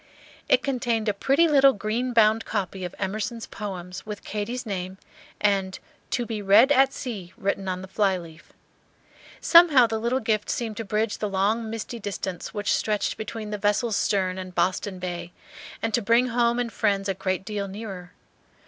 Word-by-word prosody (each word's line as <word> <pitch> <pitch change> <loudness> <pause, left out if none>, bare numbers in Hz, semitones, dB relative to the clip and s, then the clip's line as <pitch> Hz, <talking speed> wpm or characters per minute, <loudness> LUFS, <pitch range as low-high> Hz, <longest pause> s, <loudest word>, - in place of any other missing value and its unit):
It - - +4
contained 240 -5 -1
a 210 - +2
pretty 275 +11 +3
little 275 -3 +6
green 220 +5 -2
bound 225 -1 +4
copy 190 0 -3
of 180 0 -5
Emerson's 215 +4 -3
Poems, 185 -3 -7
with 210 -1 -7
Katy's 230 +5 -4
name 190 -2 -4 0.4
and 195 -2 +1 0.3
"To 245 - -1
be 220 -2 -4
read 205 +7 +6
at 270 -1 +5
sea," 205 -10 -6
written 195 0 -2
on 185 0 -3
the - - -8
flyleaf. 185 -5 -2 0.9
Somehow 335 -7 +7
the 225 -1 -2
little 240 +3 0
gift 215 -3 -1
seemed 225 -3 -3
to 225 - -3
bridge 215 +1 -1
the 210 - -2
long 210 +4 0
misty 225 +1 -5
distance 195 -3 -5
which 205 -2 0
stretched 210 -1 0
between 215 0 -6
the 210 - -3
vessel's 210 +2 +1
stern 190 -3 0
and 185 -1 -8
Boston 185 +1 0
Bay, 175 -1 -5 0.5
and 225 -1 -1
to 240 - +2
bring 235 +4 +3
home 235 0 +2
and 240 -2 -2
friends 195 -1 +1
a 195 - +1
great 185 0 -2
deal 205 -2 -3
nearer. 190 -3 -8
210 Hz, 175 wpm, -25 LUFS, 190-230 Hz, 0.9 s, Somehow